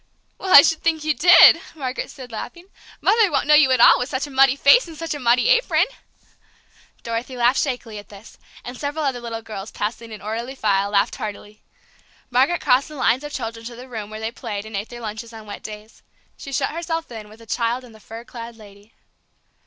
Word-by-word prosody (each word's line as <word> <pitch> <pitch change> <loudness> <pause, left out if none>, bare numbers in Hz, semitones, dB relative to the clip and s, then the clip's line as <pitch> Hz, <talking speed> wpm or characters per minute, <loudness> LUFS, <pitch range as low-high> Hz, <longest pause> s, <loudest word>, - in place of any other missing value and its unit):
"Well, 380 - -4
I 285 - +10
should 325 - +1
think 320 -2 0
you 310 0 +1
did!" 340 0 +7
Margaret 265 -3 -5
said, 255 -4 -11
laughing. 340 +10 -8 0.4
"Mother 440 -5 +3
won't 275 -2 0
know 300 - +4
you 300 -3 +6
at 260 -2 +2
all - - +7
with 250 - -3
such 260 +1 -2
a 290 - -11
muddy 270 0 +4
face 285 - +5
and 325 -2 -11
such 330 0 -4
a 290 - -6
muddy 245 - +2
apron!" - - +3 1.2
Dorothy 235 +3 -5
laughed 245 +2 +3
shakily 245 -6 -4
at 205 - -14
this, 205 +1 -15 0.3
and 245 - -7
several 295 +1 -3
other 265 -3 -1
little 230 -1 -6
girls, 215 -2 -8
passing 225 +2 -5
in 215 - -8
orderly 230 +6 -5
file, 200 -4 0
laughed 200 -1 +1
heartily. 210 0 -8 0.7
Margaret 270 +8 +2
crossed 255 +2 +2
the 305 - -11
lines 255 0 +1
of 295 - -7
children 230 -3 -6
to 240 - -9
the 250 +2 -11
room 220 -4 -7
where 215 0 -8
they 220 +1 -4
played 215 -4 -6
and 220 -1 -8
ate 200 +2 -4
their 240 0 -10
lunches 225 +1 -7
on 220 -1 -11
wet 205 -1 -9
days. 215 +1 -11 0.3
She 275 - -10
shut - - -1
herself 330 -2 -4
in 215 -2 -9
with 215 - -15
the 230 - -16
child 235 +3 -2
and 240 -3 -15
the 220 - -16
fur 225 +2 -10
clad 235 -1 -10
lady. 205 0 -17
240 Hz, 220 wpm, -21 LUFS, 220-280 Hz, 1.2 s, I